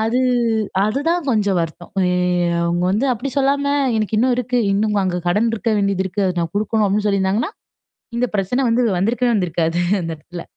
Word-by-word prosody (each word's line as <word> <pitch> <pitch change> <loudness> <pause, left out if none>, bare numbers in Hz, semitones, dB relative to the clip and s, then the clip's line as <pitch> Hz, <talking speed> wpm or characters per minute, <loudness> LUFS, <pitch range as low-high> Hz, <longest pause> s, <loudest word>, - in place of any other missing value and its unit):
அது 225 +3 +1 0.7
அதுதான் 305 +10 0
கொஞ்சம் 205 -5 +1
வருத்தம். 165 +1 -6 0.2
ஏ - - +1 0.5
அவுங்க 170 +1 0
வந்து 215 +7 +1
அப்பிடி 250 +4 -4
சொல்லாம 280 +1 +1 0.2
எனக்கு 215 0 -1
இன்னும் 250 +1 +3
இருக்கு. 250 0 -1
இன்னும் 210 0 +1
அங்க 180 -1 -1
கடன் 210 +6 +2
இருக்க 225 +1 -2
வேண்டியது 200 -1 0
இருக்கு. 195 +2 -2
அதது 180 -1 -1
நான் 165 - -4
குடுக்கணும் 215 0 +1
அப்பிடின்னு 210 +2 0
சொல்லிருந்தாங்கன்னா. 200 - 0 0.7
இந்த 250 - +2
பிரச்சனை 200 +7 0
வந்து 235 +2 +2 0.2
வந்திருக்கவே 240 +4 +1
வந்திருக்காது 170 -2 0 0.2
அந்த 165 - -4
இடத்துல 170 +3 -10
210 Hz, 170 wpm, -19 LUFS, 180-240 Hz, 0.7 s, இன்னும்